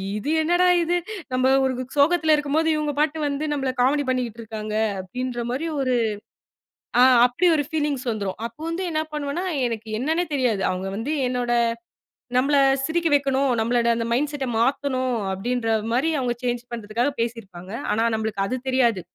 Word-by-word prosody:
இது 245 +8 -3
என்னடா 350 +3 +3 0.2
இது! 350 +2 +1 0.4
நம்ம 255 +1 +2 0.2
ஒரு 260 -1 +1 0.2
சோகத்துல 315 +2 +4
இருக்கும்போது 300 +2 +1
இவங்க 300 -1 -1
பாட்டுக்கு 305 0 +1
வந்து 285 +2 -2
நம்மள 270 -2 -1
காமெடி 285 +3 +3
பண்ணிக்கிட்டு 245 -3 -2
இருக்காங்க. 215 -1 -6 0.3
அப்படின்ற 250 +6 -5
மாரி 300 +6 -2
ஒரு, 255 -2 +1 1.1
அ - - +8 0.2
அப்படி 330 +9 +1
ஒரு 290 - 0
ஃபீலிங்ஸ் 295 -4 -1
வந்துரும். 200 -4 -3
அப்போ 235 +6 -24
வந்து 350 +3 -3
என்ன 310 0 0
பண்ணுவனா, 300 +4 -2 0.2
எனக்கு 225 -1 -5
என்னன்னே 320 +6 0
தெரியாது. 245 -8 +1
அவங்க 185 +1 -4
வந்து 255 +8 -2
என்னோட 245 -1 -1 0.9
நம்மள 275 +3 +3 0.3
சிரிக்க 335 +1 0
வைக்கணும். 275 -1 +1
நம்மளோட 235 0 +1
மைண்ட் 290 +4 0
செட்ட 280 -2 -3
மாத்தணும் 260 0 0 0.2
அப்டின்ற 235 +4 -2 0.2
மாரி 265 +7 +2
அவங்க 250 -2 0
சேஞ்ச் 245 -1 -1
பண்றதுக்காகப் 235 +5 -2
பேசி 230 0 -2
இருப்பாங்க. 185 -2 -12 0.2
ஆனா 220 +2 +1
நம்மளுக்கு 220 -3 -2
அது 255 - -2
தெரியாது. 240 -6 +2
255 Hz, 155 wpm, -23 LUFS, 230-295 Hz, 1.1 s, அ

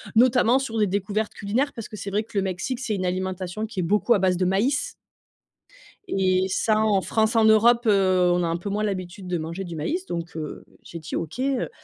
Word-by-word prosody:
notamment 250 +1 +4
sur 230 -4 -4
des 210 - +3
découvertes 200 +3 -2
culinaires, 235 +8 -1
parce 230 - -8
que 215 - -8
c'est 200 - -5
vrai 205 +2 0
que 225 -1 -8
le - - +3
Mexique, 190 +7 -3
c'est 245 -5 -2
une 185 -2 -2
alimentation 185 +2 -3
qui 210 -4 -4
est - - -1
beaucoup 210 +7 +2
à 210 - +2
base 185 -1 +2
de 185 - +1
maïs 210 +10 +1 1.2
et 185 - +1
ça, 215 +3 +1
en 210 -3 +2
France, 220 +5 0
en 225 - +5
Europe, 230 +3 +5
heu, 185 -3 +3
on 175 0 +1
a - - 0
un 165 0 -1
peu 175 +4 -6
moins 210 +2 -1
l'habitude 190 -1 -4
de 180 -1 -1
manger 165 +4 -5
du 170 -3 -7
maïs. 335 - -2
Donc, 170 - -5
heu, 155 -2 -6 0.2
j'ai 170 - -8
dit 155 - -6
OK, 165 +8 -4
heu 265 -1 0
200 Hz, 230 wpm, -24 LUFS, 185-225 Hz, 1.2 s, en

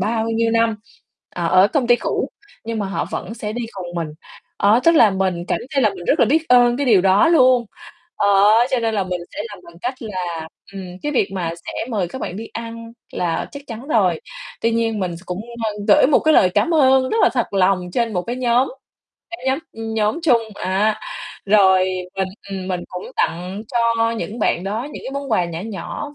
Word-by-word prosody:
bao 220 +3 0
nhiêu 230 0 +1
năm, 230 -1 +2 0.6
ờ, 170 -1 -2
ở 185 +3 +5
công 265 +1 0
ty 240 0 +5
cũ - - -2 0.4
nhưng 225 -1 -3
mà 205 - -1
họ 195 - -2
vẫn 225 - -5
sẽ 215 -2 -5
đi 240 +1 -3
cùng 185 -2 -7
mình. 165 -2 -2 0.5
Đó, 210 +4 +4
tức 335 - +6
là 225 -9 +6
mình 190 -2 -1
cảm - - +1
thấy 275 -2 +2
là 215 - +4
mình 185 -3 -9
rất - - +2
là - - +5
biết 315 +6 +1
ơn 245 -1 +5
cái 280 +1 -1
điều 215 -6 +5
đó 195 - +4
luôn, 255 -6 +5 0.5
ờ, 205 - +2 0.4
cho 255 - +2
nên 225 -1 0
là 200 -2 0
mình 180 -1 -3
sẽ - - -5
làm 205 - -10
bằng 170 - -14
cách 250 +2 -2
là, 175 -6 -4 0.2
ừm, 195 -1 -6 0.2
cái 295 - -2
việc 210 - +2
mà 175 -4 -2
sẽ - - -5 0.2
mời 200 -6 -1
các 260 - -8
bạn 180 - -4
đi 225 +2 -6
ăn 230 0 -7 0.2
là 170 -2 -2
chắc 285 0 -8
chắn 240 +5 -8
rồi. 185 - +2 0.4
Tuy 230 - +2
nhiên 225 -2 0
mình 175 -3 -2
s - - -12
cũng, 180 +2 -4 0.2
ơ, 215 - 0 0.2
gửi 300 -3 +6
một 285 - +4
cái 310 0 +3
lời 185 - +5
cám 335 - +1
ơn 265 -3 +4
rất - - 0
là - - +6
thật 240 -3 0
lòng 185 -2 +2
trên 230 0 0
một 180 - -1
cái 240 +6 -4
nhóm 250 0 +2 0.6
cái 345 -6 -8
nhóm, 265 +1 +2
ưm, 225 0 -5
nhóm 215 +4 +1
chung 245 -8 +4
á, 200 +3 0 0.5
rồi 190 -2 +5 0.3
mình, 190 -1 -1 0.2
ừm, 190 -1 -5
mình 180 -2 -2
cũng 180 0 -7
tặng 180 +5 -2
cho 230 -1 +1
những 225 0 -5
bạn 180 -4 0
đó 215 +5 -2
những - - -8
cái 270 - -5
món 280 -2 -5
quà 180 -5 +3
nhỏ 170 -1 -5
nhỏ, 225 +7 -6
220 Hz, 225 wpm, -20 LUFS, 190-240 Hz, 0.6 s, tức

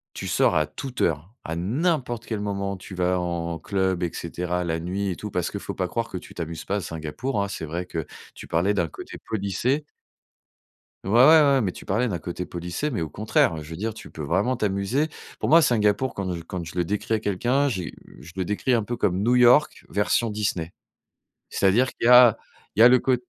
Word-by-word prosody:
tu - - -5
sors - - +3
à 75 -1 +2
toute 135 -3 -7
heure, 85 +5 -1
à 80 - -4
n'importe 120 - -1
quel 110 - -3
moment 100 -1 -2
où - - -9
tu 95 - -10
vas 90 0 +1
en 85 -1 -3
club 95 -2 -1
et 85 - -1
cetera, 90 +1 -3
la 80 -2 -1
nuit 95 +4 -2
et 90 - -3
tout, 105 - -6
parce 90 -2 -1
qu'il 100 - -4
faut 100 - -6
pas 90 -1 -2
croire 115 +3 -2
que 95 - -5
tu - - -13
t'amuses 85 -1 -5
pas 100 - -1
à - - -1
Singapour, 85 - -3
hein. 100 - -2
C'est 100 - -5
vrai 85 +3 -4
que 80 -3 -5 0.3
tu - - -10
parlais 90 +5 +1
d'un 90 -4 +1
côté - - -10
polissé. 110 +8 -1 1.2
Ouais, 95 - -3
ouais, 115 - +4
ouais, 155 +4 +8
ouais, 140 -2 +4
mais 100 -6 0
tu - - -11
parlais 115 +6 0
d'un 90 -5 -2
côté 90 +1 -5
polissé, 90 - -4
mais 110 - -2
au 80 - -4
contraire, 85 -5 +1
je 75 - -12
veux 80 - -7
dire, 110 +5 -3
tu 110 - -11
peux 80 - -7
vraiment 95 - +1
t'amuser, 105 +8 0 0.3
pour - - -1
moi 165 +2 +8
Singapour 120 -2 +2
quand 95 -2 -3
je 85 - -5
quand 85 +1 -6
je 80 +2 -10
le 90 - +1
décris 105 +3 -2
à 110 - 0
quelqu'un, 120 +8 +1
j'ai 95 -9 -3 0.2
heu, - - -16
je 85 - -12
le 95 -2 -2
décris 105 +6 0
un 115 -2 +3
peu 120 +3 -4
comme 95 -3 0
New 120 +3 +3
York 125 +5 +4
version 105 +3 +1
Disney. 100 -5 -2 0.8
C'est-à-dire 105 +7 +3
qu'il - - -3
y - - +5
a 125 -3 +8 0.4
il - - -1
y - - +9
a - - +11
le 125 +1 +6
cô 130 +1 +2
100 Hz, 235 wpm, -24 LUFS, 85-120 Hz, 1.2 s, a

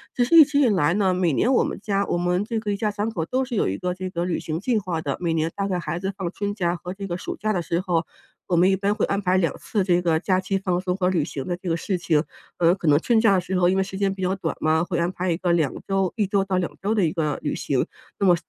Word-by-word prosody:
其 245 - +3
实 335 - +2
一 320 - +11
直 290 0 0
以 270 - +5
来 170 -5 +2
呢， 190 -3 +2
每 180 -3 +1
年 235 - +2
我 - - +4
们 - - -4
家 200 -1 0
我 - - 0
们 180 +2 +1
这 225 0 -2
个 210 -2 -3
一 - - -3
家 210 0 0
三 205 +2 -2
口 165 -7 -3
都 260 +7 -1
是 245 -3 -5
有 - - +1
一 95 - -3
个 180 0 -2
这 185 0 -5
个 175 -1 -2
旅 180 - -1
行 160 +1 -4
计 230 +2 0
划 180 -5 -2
的， 140 -3 -2
每 170 -2 0
年 160 0 0
大 200 0 -1
概 180 -2 -1
孩 170 - -3
子 195 +1 -3
放 180 -3 -2
春 205 0 -3
假 175 -3 0
和 180 +2 -7
这 195 0 -6
个 175 0 -3
暑 - - -6
假 215 +1 -1
的 175 - 0
时 170 +1 -1
候， 175 -3 0 0.4
我 175 - +1
们 180 +3 +5
一 190 - +3
般 200 +2 0
会 210 - 0
安 200 +1 -1
排 185 0 +2
2 165 -5 0
次 220 - -8
的 - - +3
这 180 -1 +2
个 165 -2 +2
假 185 0 +1
期 195 +1 -1
放 180 -2 0
松 180 -1 -1
和 180 -1 +1
旅 170 -5 +1
行 140 -3 -5
的 175 - -1
这 180 -1 -5
个 165 - +1
事 190 +1 -2
情。 165 -3 +1 0.3
呃， 175 +1 +4
可 170 - -5
能 145 +1 +5
春 230 +4 +2
假 215 -4 +5
的 185 - +3
时 185 +1 -2
候， 175 0 +4
因 190 - +1
为 - - +3
时 190 0 -7
间 195 -1 +1
比 190 - -9
较 185 +1 0
短 165 -4 -3
嘛， 160 +1 +2
会 175 -1 -2
安 170 +1 +1
排 185 -1 -2
一 165 - 0
个 180 -2 0
2 155 -5 +1
周 195 -2 +1
1 205 -3 +1
周 195 0 +1
到 190 -1 -1
2 180 - -2
周 205 +3 0
的 200 -5 +2
一 155 - -1
个 150 -5 -1
旅 - - -2
行。 - - 0 0.3
那 200 - +2
么 175 - +6
185 Hz, 340 characters per minute, -23 LUFS, 170-200 Hz, 0.4 s, 一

